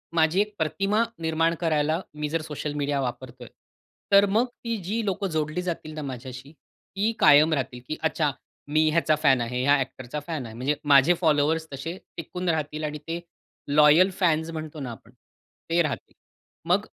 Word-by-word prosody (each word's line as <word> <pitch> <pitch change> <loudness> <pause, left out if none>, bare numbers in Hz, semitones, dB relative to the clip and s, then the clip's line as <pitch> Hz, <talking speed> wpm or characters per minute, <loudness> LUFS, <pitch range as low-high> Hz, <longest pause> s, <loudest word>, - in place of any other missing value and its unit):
माझी 165 +3 +3
एक 210 0 -3
प्रतिमा 195 +8 +1 0.2
निर्माण 165 +1 +1
करायला 155 -1 +1
मी 150 0 -4
जर 165 +1 -1
सोशल 150 -1 -5
मीडिया 145 -1 -1
वापरतोय. 125 -1 -6 0.6
तर 200 0 +7
मग 220 +5 +3
ती 235 -1 -5
जी 220 +6 -2
लोक 195 0 -2
जोडली 155 -1 -1
जातील 170 -3 -5
ना 155 - -5
माझ्याशी, 130 0 -7
ती 200 +6 -5
कायम 150 +2 +6
राहतील. 130 -3 -2
की 155 - -4
अच्छा 155 -2 +1 0.4
मी 155 +1 +3
ह्याचा 155 -1 +2
फॅन 135 -5 +4
आहे, 125 +2 -2
या 140 +2 +5
ॲक्टरचा 130 +1 -4
फॅन 155 -6 -3
आहे 110 -1 -9
म्हणजे 130 +5 0
माझे 145 +3 +6
फॉलोवर्स 160 0 +2
तसे 165 +6 -5 0.2
टिकून 180 +2 -4
राहतील 155 -1 -2
आणि 150 0 -3
ते 165 +1 -3 0.5
लॉयल 150 +5 +6
फॅन्स 160 -3 +2
म्हणतो 155 -1 -6
ना 130 -4 -5
आपण, 115 - -13 0.6
ते 170 +1 +3
राहतील. 155 -4 -3 0.6
मग - - +3
155 Hz, 170 wpm, -25 LUFS, 145-170 Hz, 0.6 s, तर